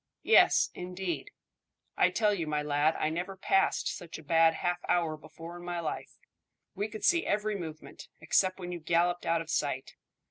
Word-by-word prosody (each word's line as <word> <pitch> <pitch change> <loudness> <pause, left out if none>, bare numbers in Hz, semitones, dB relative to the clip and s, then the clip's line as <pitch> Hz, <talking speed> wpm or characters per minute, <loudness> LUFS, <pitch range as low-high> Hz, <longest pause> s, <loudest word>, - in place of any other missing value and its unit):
"Yes, 450 - +5
indeed. 180 - -4 0.7
I - - +4
tell 210 -2 +2
you, 170 -5 -3
my 150 -1 -1
lad, 150 +2 +2
I 155 - 0
never 180 +4 -4
passed 195 +1 +2
such 170 -2 -8
a 160 - -12
bad 165 +1 +4
half 175 +1 -1
hour 170 -3 +2
before 165 +2 -11
in 175 - -11
my 175 -1 -3
life. 160 -2 -5 0.6
We 205 - -2
could 215 0 -9
see 345 -1 +4
every 210 0 0
movement, 160 -4 -8
except 185 +4 +2
when 180 -1 -5
you 175 - -5
galloped 175 +2 +1
out 165 0 +2
of 160 -1 -6
sight. 135 -3 -2
175 Hz, 180 wpm, -30 LUFS, 160-190 Hz, 0.7 s, Yes